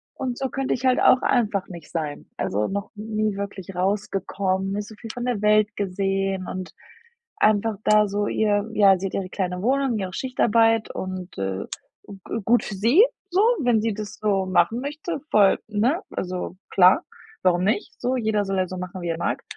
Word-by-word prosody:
Und 255 -2 -3
so 265 -1 -2
könnte 270 +1 -1
ich 255 - -3
halt 255 -1 +4
auch 255 - +6
einfach 215 -6 +1
nicht 170 -4 -10
sein. 155 -3 -4
Also 105 +2 -1
noch 200 +1 -4
nie 215 -1 -2
wirklich 195 -2 -6
rausgekommen, 195 0 -1
nicht 205 +1 -3
so 220 - -11
viel 225 +2 -10
von 245 0 -4
der 245 -5 -1
Welt 210 0 +3
gesehen 195 -1 -1
und 185 -3 -5 0.7
einfach 215 0 +2
da 210 0 +4
so 205 +1 -1
ihr 210 0 +1
ja, 200 -3 +5
sie 195 - -2
hat - - -9
ihre 185 -2 -3
kleine 180 -1 -3
Wohnung, 265 0 +1
ihre 190 -3 -4
Schichtarbeit 225 -2 +2
und, 185 - -6
äh, 95 0 -3 0.4
g 200 -2 -10 0.3
gut 240 +2 +4
für 210 - -5
sie, 235 - +5 0.3
so, 370 - +3 0.2
wenn 240 -4 +3
sie 225 -1 0
das 210 -1 -6
so 200 -3 0
machen 205 +5 +2
möchte, 300 +3 -4
voll, 200 -2 +5
ne? 235 - +1
Also 180 0 -4
klar, 185 - +5 0.4
warum 180 -1 +2
nicht? 205 +1 -1
So 255 +1 0
jeder 215 -4 0
soll 195 0 -2
ja 185 -1 +1
so 185 - -6
machen, 185 +1 -6
wie 175 - -4
er 165 - -1
mag. 170 - -2
205 Hz, 190 wpm, -24 LUFS, 185-225 Hz, 0.7 s, auch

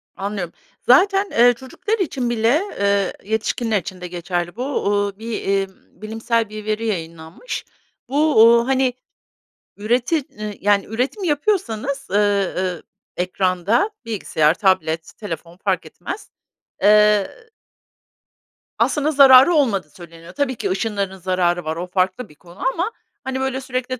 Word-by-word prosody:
Anlıyorum. 195 -3 -4 0.3
Zaten, 390 +9 +4
eee, 245 +1 +5
çocuklar 275 - -4
için 265 -9 -1
bile, 240 +7 +2 0.2
eee, 200 -1 +1 0.2
yetişkinler 220 -1 0
için 185 +1 -9
de 180 - -5
geçerli 175 0 -3
bu, 260 0 -3
ııı, 205 -1 0
bir, 230 +1 -6
iii, 195 0 0 0.3
bilimsel 225 0 -1
bir 215 0 -8
veri 215 +1 -2
yayınlanmış. 165 - -5 0.4
Bu, 300 +2 +2
uuu, 235 +1 +5
hani, 260 -2 +2 0.8
üretim 245 +8 0 0.4
yani 200 0 +3
üretim 255 - -2
yapıyorsanız, 280 - -1
ııı, 195 -3 0 0.3
ekranda 185 - +1 0.2
bilgisayar, 165 -8 +1
tablet, 165 -4 0
telefon 170 -4 -7
fark - - -1
etmez - - -8 0.5
eee 210 - +3 1.3
aslında 300 +1 +1
zararı 270 +2 +8
olmadığı 205 - +1
söyleniyor. 170 +1 -13
Tabii 270 -3 -1
ki - - -3
ışınlarının 200 -2 -2
zararı 175 -2 0
var 160 +1 -2
o 175 +2 -5
farklı 190 +6 -1
bir 150 - -18
konu 175 +4 -17
ama, 365 +7 -2 0.3
hani, 265 0 -3
böyle 265 0 -2
sürekli, 255 -1 -4
215 Hz, 130 wpm, -20 LUFS, 185-260 Hz, 1.3 s, zararı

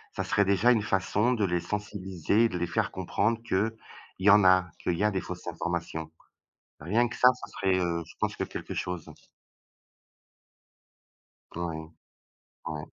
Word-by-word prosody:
ça - - -1
serait 100 - +2
déjà 100 +5 +4
une 110 -3 +3
façon 105 +4 +1
de 110 -5 +1
les 90 -1 0
sensibiliser 100 +1 0
et - - +2
de 90 - -3
les 85 0 -1
faire - - -1
comprendre 115 +2 0
qu'il 110 0 +1 0.5
y 95 +2 +4
en 105 0 +7
a, 95 -1 +5
qu'il 85 - -1
y 105 - 0
a 105 - +3
des 95 - -1
fausses 90 0 -8
informations, 85 -2 -3 0.7
rien 110 +11 +2
que - - -7
ça 125 - +6 0.2
ce - - -18
serait, 95 -1 +1
heu, 85 -2 -1
je - - -15
pense - - -1
que - - -1
quelque - - -6
chose. 90 -3 -4 2.4
Ouais, 80 -2 -4 0.8
ouais. 75 -2 -4
95 Hz, 165 wpm, -28 LUFS, 85-105 Hz, 2.4 s, en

